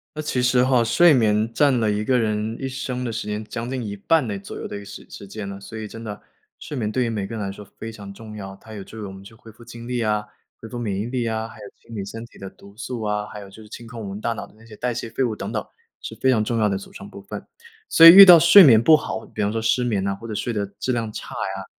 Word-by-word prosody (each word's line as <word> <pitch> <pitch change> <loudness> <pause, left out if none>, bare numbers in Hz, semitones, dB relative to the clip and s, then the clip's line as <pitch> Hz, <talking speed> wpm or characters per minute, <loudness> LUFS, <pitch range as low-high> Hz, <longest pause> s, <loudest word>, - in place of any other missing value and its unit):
那 155 - -3
其 140 -4 -1
实 125 0 +3
哈， 130 -2 +3
睡 155 +9 +5
眠 110 -2 +2
占 140 -3 +3
了 110 -2 +1
一 105 +1 -1
个 125 +3 +2
人 110 0 -1
一 135 - -3
生 130 -1 -4
的 120 - -3
时 110 -1 -5
间， 105 +1 -3
将 115 +2 -6
近 130 -2 -3
一 100 - -5
半 150 +7 +1
的 100 -2 -3
左 100 - -9
右 - - -6
的 - - -7
一 - - -5
个 100 - -11
时 100 - -10
时 100 - -10
间 100 +1 -7
了， 100 0 -7
所 110 +3 -10
以 110 -1 -6
真 115 +2 -10
的， 105 -2 -7 0.4
睡 150 - -7
眠 110 -5 -2
对 130 +3 0
于 - - -1
每 105 -4 -3
个 115 - -7
人 110 - -4
来 95 - -4
说 105 +1 -10
非 115 - -7
常 100 -3 -10
重 110 +1 -11
要。 95 -2 -8
它 110 +3 -14
有 100 -2 -7
助 110 - -13
于 - - -7
我 95 - -7
们 95 0 -12
去 105 +3 -14
恢 115 -1 -15
复 115 +2 -17
精 120 0 -11
力 125 -1 -2
啊、 105 -1 0 0.3
恢 115 - -10
复 120 - -6
免 105 -5 -3
疫 105 - -2
力 120 -1 -2
啊， 110 0 -2
还 110 - -14
有 100 - -9
清 115 - -13
理 100 - -4
身 115 +4 -8
体 120 - -18
的 95 - -7
毒 100 +1 -18
素 120 0 -6
啊， 105 0 -2
还 105 - -9
有 100 - -11
就 105 +3 -14
是 105 - -15
清 120 - -10
空 115 0 -8
我 105 - -6
们 100 +1 -6
大 115 +2 -1
脑 - - -7
的 - - -23
那 115 - -18
些 110 -2 -13
代 125 - -2
谢 120 0 -5
废 115 +4 -1
物 115 -4 -1
等 - - -6
等， - - -2 0.4
是 - - -7
非 130 - +2
常 110 -4 +2
重 115 +2 -2
要 110 -2 +2
的 100 -2 -1
组 95 - -11
成 100 - -10
部 100 - -11
分。 105 +1 -8 0.4
所 165 - +5
以 - - +14
遇 195 +3 +11
到 175 -3 +10
睡 180 +5 +9
眠 115 -8 +7
不 155 +6 +6
好， 110 - -5
比 110 - -6
方 100 - 0
说 115 +1 -2
失 115 +3 +1
眠 105 -6 -1
呐， 100 0 -1
或 115 +4 -10
者 110 - -5
睡 120 - -3
的 105 -3 -2
质 130 - -1
量 115 -3 -2
差 - - -8
呀， - - -4
110 Hz, 345 characters per minute, -22 LUFS, 105-120 Hz, 0.4 s, 以